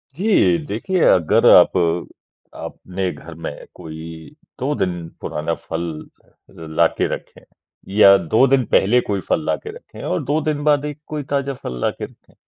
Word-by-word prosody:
जी 170 - +3
देखिए, 170 - -2
अगर 85 -4 +3
आप - - +7 0.8
अपने 95 0 -5
घर 80 +3 -11
में - - -6
कोई 80 - -10 0.2
2 140 +4 -1
दिन 90 -3 -2
पुराना 80 +2 -3
फल 80 +1 -5 0.9
लाके - - +2
रखें। - - -9 0.5
या 100 -2 +8
2 95 +8 +3
दिन 130 -1 +3
पहले 120 +6 +4
कोई 100 - 0
फल 160 - +1
लाके 440 - -2
रखे 485 - -12
और 160 - -1
2 145 +4 0
दिन 150 -1 -2
बाद 150 -1 +2
एक 150 0 -6
कोई 150 -2 -4
ताज़ा 140 -1 0
फल 60 -1 -5
लाके - - -2
रखे। - - -20
110 Hz, 155 wpm, -20 LUFS, -, 0.9 s, या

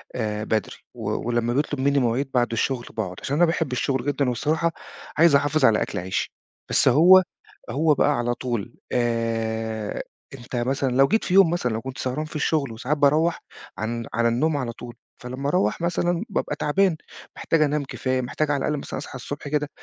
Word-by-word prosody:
آآ، 105 -3 -2
بدري 110 -2 -1 0.2
ولمّا 120 0 -1
بيطلُب 145 +1 -1
مني 140 +1 +3
مواعيد 130 +2 0
بعد 120 -2 +2
الشغل 120 +1 -1
باقعد، 95 -5 -3
عشان 140 - -2
أنا 175 +3 +5
باحب 165 -4 -1
الشغل 130 0 -1
جدًا 145 -2 +1
وبصراحة 155 +7 0 0.5
عايز 165 -2 +6
أحافظ 145 0 +3
على 110 -3 +4
أكل 100 - -2
عيشي، 95 +1 -3 0.4
بس - - +3
هو، 185 +5 +7 0.5
هو 155 +2 +3
بقى 145 - +2
على 120 0 0
طول 120 -2 -4 0.2
آآ، 115 -2 -1 0.3
أنت 125 -1 -8
مثلًا 130 +2 0
لو 135 +1 +5
جيت 220 - +1
في - - -2
يوم 195 -3 +7
مثلًا 165 -8 -1
لو 110 - -3
كنت 130 +1 -7
سهران 130 +4 -2
في 155 - -12
الشغل 150 -3 0
وساعات 125 +7 -2
باروّح 150 +4 +3 0.4
عن 115 +3 -3
على 115 0 +2
النوم 145 +7 +1
على 125 -4 -2
طول، 120 0 -10 0.3
فلمّا 130 +3 -4
أروّح 180 +2 +1
مثلًا 175 0 0
بابقى - - -2
تعبان، 180 +3 +1 0.4
محتاج 165 - 0
أنام 150 0 +1
كفاية، 130 -1 -2
محتاج 150 +4 -1
على 145 - +1
الأقل 150 - 0
مثلًا - - -6
أصحى 145 - -8
الصبح 145 +3 -6
كده 150 0 -1
135 Hz, 185 wpm, -24 LUFS, 120-150 Hz, 0.5 s, هو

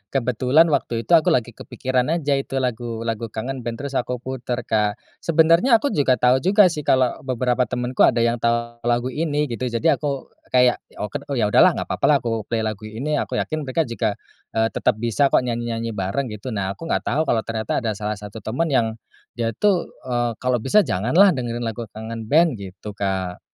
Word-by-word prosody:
kebetulan 130 +6 +3
waktu 115 -5 -1
itu - - -8
aku 165 -2 +6
lagi 120 -1 +2
kepikiran 125 +1 -2
aja 145 -4 0
itu 135 0 -6
lagu 120 -3 -2
lagu 115 0 -3
Kangen 125 +5 -5
Band 115 +3 -5
terus 140 -2 -1
aku 125 +1 -3
putar 125 -2 -4
Kak. 105 -2 0 0.2
Sebenarnya 165 - +4
aku 275 +5 +1
juga 135 -4 +3
tahu 125 +2 +3
juga 190 +4 +5
sih 150 -3 -6
kalau 130 -2 +2
beberapa 125 -1 0
temanku 125 0 +2
ada 115 0 +2
yang 120 0 +1
tahu 120 0 -1
lagu 120 +2 +1
ini 150 -2 -1
gitu. 125 +2 -2
Jadi 120 +8 +2
aku 140 -3 -3 0.2
kayak, 125 -1 +4 0.2
oket 105 -2 -5
oh - - 0
yaudahlah 105 -4 +5
nggak - - -4
apa-apa - - -1
lah 150 - +5
aku 115 -2 -2
play 115 - -1
lagu 110 -1 -4
ini. 135 +8 -3
Aku - - -3
yakin 155 -1 -2
mereka 160 +6 +1
juga, 115 -5 -2 0.4
eee, 110 0 +3
tetap - - +1
bisa 120 +5 +1
kok 130 - +2
nyanyi-nyanyi 115 -1 -3
bareng 100 +8 -2
gitu, 105 +4 -8
nah 100 -3 -2
aku 165 - -8
enggak - - 0
tahu 155 - +1
kalau 115 - +2
ternyata 110 -1 -2
ada 115 - 0
salah 105 +1 -3
satu 105 +1 -9
teman 135 +10 -1
yang 125 -6 +2 0.4
dia 115 -2 -3
tuh, 195 -5 +2 0.2
eee, 120 -2 -1
kalau 125 -1 +1
bisa 135 - +3
janganlah 160 - +4
dengerin 120 -4 -3
lagu 115 0 -4
Kangen 110 +2 -7
Band, 155 -3 +3
gitu 100 +2 -8
Kak. 95 -3 -3
120 Hz, 200 wpm, -22 LUFS, 115-140 Hz, 0.4 s, aku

